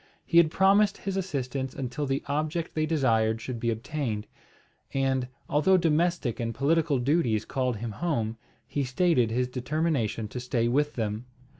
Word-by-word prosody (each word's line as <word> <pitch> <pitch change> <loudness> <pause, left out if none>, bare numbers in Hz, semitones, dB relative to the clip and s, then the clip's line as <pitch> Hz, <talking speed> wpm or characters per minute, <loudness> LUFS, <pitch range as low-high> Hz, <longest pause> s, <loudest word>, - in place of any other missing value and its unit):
He 170 - +2
had 170 -2 +7
promised 195 +3 +4
his 195 -1 -4
assistance 135 -8 -3
until 135 +2 -3
the 135 +1 -1
object 155 +3 -2
they 155 0 0
desired 115 -8 +2
should 120 +1 -5
be 115 - 0
obtained; 115 -2 -3 0.7
and, 135 -2 +1 0.2
although 155 +6 +4
domestic 165 -5 +1
and 115 -1 -2
political 155 +1 +2
duties 120 -5 +1
called 130 -2 -1
him 115 +1 -4
home, 115 - -2 0.3
he 145 - -2
stated 130 -2 +2
his 125 +2 0
determination 125 -4 -1
to 125 - -5
stay 120 -1 0
with 145 +5 +1
them. 110 +1 -3
135 Hz, 155 wpm, -27 LUFS, 120-155 Hz, 0.7 s, had